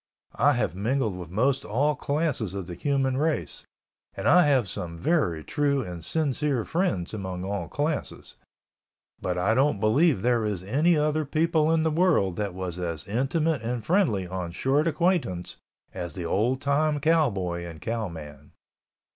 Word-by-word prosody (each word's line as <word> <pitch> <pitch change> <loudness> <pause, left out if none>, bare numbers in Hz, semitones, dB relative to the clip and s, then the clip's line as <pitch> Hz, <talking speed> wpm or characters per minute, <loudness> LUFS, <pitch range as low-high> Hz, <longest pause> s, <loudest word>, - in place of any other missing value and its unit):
I - - +5
have - - 0
mingled 110 +2 -1
with 90 -3 -8
most 125 +9 +1
all 145 +7 +1
classes 140 - -1
of 95 -2 -4
the 90 - -7
human 135 - 0
race 155 +2 -1 0.5
and - - -2
I 180 +2 +6
have 130 -7 +3
some 85 -1 -5
very 125 - 0
true 140 - 0
and 90 -5 -7
sincere 145 - 0
friends 115 - -1
among 95 -3 -4
all 100 +1 -3
classes—but 145 - -6
I 95 +5 +2
don't 130 -3 +2
believe 115 - +3
there 120 -2 +2
is 105 -4 -2
any 150 - +2
other 155 +1 +1
people 160 +1 +1
in 165 -1 +2
the 160 - +1
world 155 - +2
that 100 -3 -3
was 90 -2 -4
as 85 -4 -4
intimate 140 +8 0
and 120 0 -3
friendly 160 - +2
on 90 -1 -4
short 140 - +1
acquaintance 165 - 0 0.4
as 90 -2 -5
the 90 -3 -4
old 120 +10 +1
time 145 +1 +1
cowboy 105 - +1
and 85 -2 -8
cowman. 80 -11 -6
120 Hz, 155 wpm, -26 LUFS, 90-150 Hz, 0.5 s, I